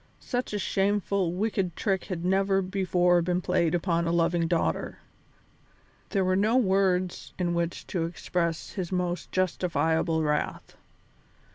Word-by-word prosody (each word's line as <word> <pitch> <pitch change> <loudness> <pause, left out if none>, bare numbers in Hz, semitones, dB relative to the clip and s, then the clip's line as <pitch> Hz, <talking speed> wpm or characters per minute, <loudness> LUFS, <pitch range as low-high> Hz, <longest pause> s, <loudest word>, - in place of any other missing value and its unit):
Such 245 0 -3
a 210 - -1
shameful, 200 -2 0
wicked 190 -2 -1
trick 195 -3 -1
had 175 -3 -4
never 195 +1 +2
before 180 -2 +2
been 175 +1 0
played 175 -2 +1
upon 170 -1 0
a - - +1
loving 170 0 +2
daughter. 170 0 -1 1.1
There 195 -3 +1
were 185 0 +2
no 215 +5 +3
words 190 -5 +1
in 175 -2 0
which 170 0 -2
to 170 -3 -2
express 170 -1 -2
his 185 -3 -4
most 180 -1 -2
justifiable 165 -3 +1
wrath. 150 -1 -2
180 Hz, 135 wpm, -27 LUFS, 170-195 Hz, 1.1 s, no